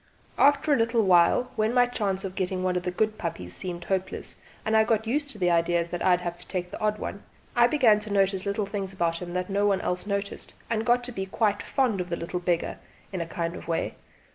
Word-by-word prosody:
After 290 +1 +5
a - - +4
little 230 0 +2
while, 185 +7 +4
when 220 +1 +1
my 245 0 +6
chance 205 -5 -2
of 190 -2 -4
getting 185 -1 -2
one 185 -1 +1
of 180 - +1
the 180 - -2
good 215 +4 -1
puppies 90 - -5
seemed 175 -2 -5
hopeless 190 -1 -3 0.3
and 220 - +1
I 220 - +6
got 220 0 +1
used 285 +5 -1
to 230 - -8
the 180 -3 +2
idea 170 0 +2
that 175 0 -5
I - - +3
would 180 0 +4
have 175 -1 -4
to - - -10
take 180 -2 -3
the - - -7
odd 215 0 +1
one, 200 - -5 0.3
I 240 -1 +6
began 240 -7 +4
to 210 0 -8
notice 195 -1 +1
little 200 +1 0
things 195 -1 -4
about 170 -2 -1
him 175 -1 -6
that 180 0 -1
no 200 +1 +1
one 195 -2 +2
else 180 +2 -2
noticed, 200 0 -3 0.2
and 225 +1 0
got 245 +1 +4
to 250 - -3
be 190 -4 -4
quite 205 0 +1
fond 240 -8 0
of 180 - -6
the 170 - -2
little 175 +2 -3
beggar 175 -1 -1 0.3
in 185 - -2
a 165 - -3
kind 170 +1 -3
of - - -9
way. 165 -1 -1
195 Hz, 250 wpm, -27 LUFS, 180-220 Hz, 0.3 s, my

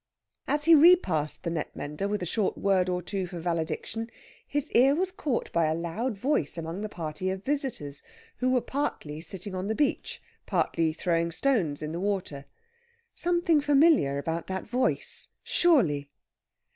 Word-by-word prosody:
As 295 0 0
he 335 - +7
repassed 290 - +5
the 170 - -2
net 160 -2 -4
mender 150 +7 -4
with 205 -2 -2
a - - -1
short 205 +4 0
word 190 -2 +2
or 180 0 -1
two 190 +1 -3
for 175 -1 -7
valediction, 175 +7 -3 0.4
his 290 -1 -1
ear 270 +4 +5
was 370 +3 0
caught 275 -9 -2
by 170 -2 +2
a 155 - +1
loud 195 +8 -3
voice 240 - 0
among 165 +4 -4
the 215 - -4
party 165 +1 -4
of 190 +1 -4
visitors, 265 - -3 0.4
who 255 - +1
were 255 -1 +3
partly 160 - -3
sitting 190 +3 -7
on 185 +1 -3
the 220 - -1
beach, 290 +2 -1 0.3
partly 165 -1 +1
throwing 170 +1 0
stones 170 - 0
in 150 - -3
the 170 - -4
water. 185 -8 -2 0.7
Something 345 -3 +2
familiar 285 - +4
about 165 +3 -3
that 190 0 -3
voice, 250 +3 -1
surely! 170 - +2
190 Hz, 165 wpm, -28 LUFS, 165-270 Hz, 0.7 s, he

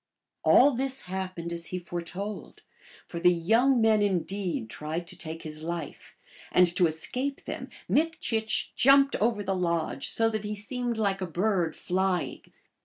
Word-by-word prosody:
All 280 +3 +6
this 265 +1 -1
happened 185 -2 -4
as 170 0 -5
he 185 - -4
foretold; 175 +4 -6 0.4
for 170 - -6
the 180 +1 +5
young 225 +10 +3
men 220 -1 +4
indeed 190 - -1
tried 155 +8 -5
to - - -7
take 160 0 -7
his 155 -1 -5
life, 165 -2 -6 0.3
and 180 - +6
to 180 - +4
escape 250 - -3
them - - -6 0.2
Mik 325 +1 +1
chich 220 -1 0
jumped 275 +2 +5
over 215 -1 +1
the 195 0 -1
lodge, 170 -3 -1
so 225 - +4
that 215 -1 -3
he 210 0 -3
seemed 240 +3 -3
like 200 -3 0
a 185 - -2
bird 175 -2 0
flying. 185 -1 -1
190 Hz, 160 wpm, -28 LUFS, 170-225 Hz, 0.4 s, All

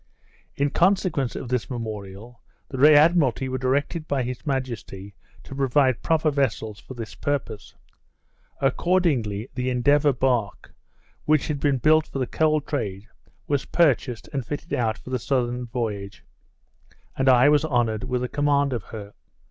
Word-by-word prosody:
In 140 0 0
consequence 175 -8 +1
of - - -5
this 125 -2 -1
memorial, 110 -1 -7 0.3
the 140 +3 +5
Admiralty 145 -5 +4
were 130 0 -3
directed 145 +5 -1
by 140 -3 0
his 125 +4 -6
majesty 115 -7 -4 0.3
to - - -10
provide 135 -1 +2
proper 160 -1 +1
vessels 115 -6 -1
for 130 - -11
this 115 -2 -7
purpose. 145 -7 -4 0.8
Accordingly, 135 - 0
the 125 0 -2
Endeavour 145 +4 +3
bark, 120 -5 -1 0.5
which 155 0 +2
had 145 -2 -2
been 140 -2 +1
built 155 +4 +3
for - - -6
the 130 - 0
coal 155 +3 +1
trade, 105 -8 -4 0.4
was 145 -2 -1
purchased 125 - +1
and 135 -2 -2
fitted 145 +7 -6
out 115 -2 0
for 130 - -11
the 130 - 0
southern 125 -1 -1
voyage, 105 -5 -4 0.9
and 135 0 +2
I 130 +2 +6
was 150 0 +4
honoured 120 -6 0
with 125 -1 -1
the 125 - -1
command 145 0 +1
of 115 -6 -4
her. 105 -2 -9
130 Hz, 150 wpm, -24 LUFS, 115-145 Hz, 0.9 s, I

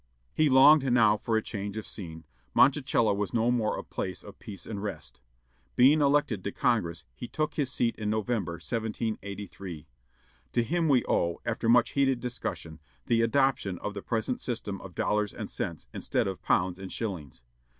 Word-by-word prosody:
He 155 -1 +3
longed 135 +1 +7
now 110 -3 +5
for 110 +1 0
a 110 - -1
change 100 0 -5
of 110 - -4
scene; 80 -5 -7 0.3
Monticello 130 -6 +4
was 100 +2 -2
no 115 +1 +3
more 115 -3 0
a - - -5
place 90 -1 -5
of 100 - -12
peace 100 -6 -8
and 100 -3 -5
rest. 100 -10 -7 0.5
Being 140 +5 +6
elected 140 -8 +2
to 100 - -2
Congress, 85 -9 0
he 120 - -7
took 155 +2 -2
his 140 -4 -1
seat 120 -2 +1
in 105 -1 -2
November, 110 -4 -1
1783. 100 -3 -5 0.7
To 120 - +2
him 165 +5 0
we 130 -4 +4
owe, 85 0 +1
after 115 0 -1
much 120 0 +5
heated 135 -3 +2
discussion, 115 -10 -5 0.3
the 115 -1 +2
adoption 115 -5 +1
of 105 - -5
the 100 - -6
present 115 +3 -2
system 110 -5 -4
of 90 -2 -11
dollars 105 -1 0
and - - -6
cents, 85 - -4
instead - - -1
of 95 -1 -4
pounds 90 0 +1
and 95 -1 -7
shillings. 85 - -5
110 Hz, 175 wpm, -28 LUFS, 95-125 Hz, 0.7 s, longed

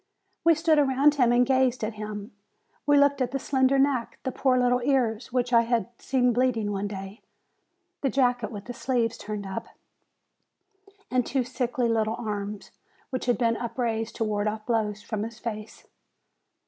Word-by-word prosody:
We 330 -1 +6
stood 315 -1 +3
around 280 +1 +4
him 250 -5 +3
and 245 +1 +4
gazed 260 -2 +2
at 215 +1 -2
him. 210 +1 -6 0.6
We 290 0 +5
looked 280 -1 +4
at 250 - +1
the 275 - -2
slender 265 0 +2
neck, 270 -3 +1
the 260 - -2
poor 255 0 +2
little 250 0 +2
ears, 240 -3 0
which 245 0 0
I 230 - +7
had 235 0 0
seen 250 -2 +1
bleeding 230 -4 +1
one 200 0 -2
day, 195 +1 -8 0.8
the 275 - +1
jacket 245 -4 +1
with 205 -2 -7
the 245 - -6
sleeves 235 -2 0
turned 210 -1 -6
up, 190 0 -5 1.4
the 255 0 +3
two 260 +2 -1
sickly, 245 -1 -1
little 220 -1 +1
arms, 205 -2 -5 0.4
which 255 -1 -3
had 245 - +3
been 230 -2 +1
upraised 230 -2 -2
to - - -1
ward 210 -1 -1
off 215 0 -3
blows 215 -3 -1
from 220 -2 -3
his 225 +1 -5
face. 215 -2 -7
240 Hz, 175 wpm, -26 LUFS, 215-260 Hz, 1.4 s, I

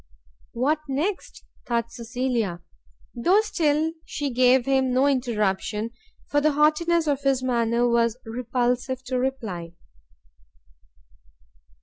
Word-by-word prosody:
What 285 +6 +1
next? 330 +9 -3 0.2
thought 235 -1 -1
Cecilia; 235 -6 -2 0.5
though 360 - +3
still 320 -6 0
she 290 -4 -4
gave 250 0 +4
him 265 -1 +2
no 260 +2 +3
interruption, 220 -4 0 0.4
for 290 - +1
the 305 0 +2
haughtiness 315 +3 +3
of 285 -2 0
his 270 -2 +1
manner 235 -1 +1
was 235 -1 +2
repulsive 245 +2 -1
to 255 0 -2
reply. 215 -11 -3
255 Hz, 105 wpm, -24 LUFS, 235-285 Hz, 0.5 s, gave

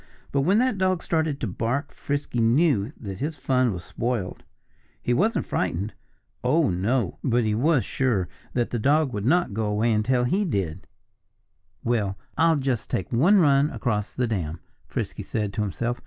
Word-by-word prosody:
But 140 - +2
when 185 +9 +3
that 240 -4 +2
dog 185 -2 +1
started 160 -4 0
to 115 - -1
bark 120 +9 -2
Frisky 145 -4 -3
knew 120 -2 +3
that 95 -3 -6
his 150 +2 -3
fun 130 -2 +2
was 90 -3 -5
spoiled. 115 -4 -3 0.6
He 120 - 0
wasn't 210 - +1
frightened. 100 +6 -2 0.5
Oh, 145 - +3
no! 100 +4 0
But 120 -2 +2
he 110 -1 +1
was 135 +4 +2
sure 115 -9 0 0.3
that 120 -2 0
the 120 - -1
dog 140 +2 +2
would 105 +2 -2
not 170 - +2
go 110 +1 -1
away 105 +3 +1
until 120 +4 +2
he 185 +12 +1
did. 95 - -2 1.0
"Well, 105 -5 0 0.2
I'll 165 +1 +4
just 130 -5 -1
take 95 - -2
one 170 - +5
run 145 -4 +4
across 105 -8 -2
the 125 - +1
dam," 85 -8 -3 0.3
Frisky - - -4
said 105 -2 -3
to 105 - -1
himself. 115 +4 -2
120 Hz, 170 wpm, -25 LUFS, 105-145 Hz, 1.0 s, one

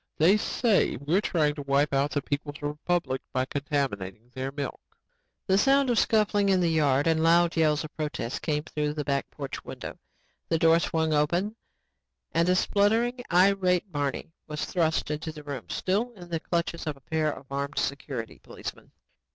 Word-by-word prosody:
They 170 +6 +6
say 215 0 +2
we're 155 - +1
trying 155 -7 +1
to 145 - -6
wipe 140 +1 +1
out 140 +1 +2
the 145 -1 -2
People's 145 0 -4
Republic 150 -2 -1
by 130 0 +1
contaminating 125 -7 -3
their 130 +1 -3
milk." 140 0 -5 0.6
The 190 0 +3
sound 275 +1 +4
of 235 - +3
scuffling 210 -2 +3
in 190 -1 +4
the 170 -2 +2
yard 145 -3 +3
and 160 -1 +2
loud 170 +1 +4
yells 155 -2 +2
of 155 - -9
protest 150 -6 -3
came 150 -2 -1
through 150 -2 -2
the 150 - -2
back 140 -1 -1
porch 140 -2 -6
window. - - -8 0.5
The 165 - +2
door 165 +1 +5
swung 160 -2 0
open 175 +8 +1 0.8
and 170 +2 +2
a 180 - +4
spluttering 225 +6 +2
and 195 +3 +5
irate 180 +1 +1
Barney 145 +1 -3
was 150 -1 -3
thrust 160 -4 0
into 150 +1 -3
the 150 -1 -11
room, 140 -5 -6
still 215 +6 -1
in 175 -5 -12
the 165 -1 -1
clutches 170 0 -2
of 150 -2 -2
a - - -20
pair 155 +1 0
of 135 0 -11
armed 140 +1 -3
security 135 -4 -3
policemen. - - -9
155 Hz, 180 wpm, -27 LUFS, 145-180 Hz, 0.8 s, They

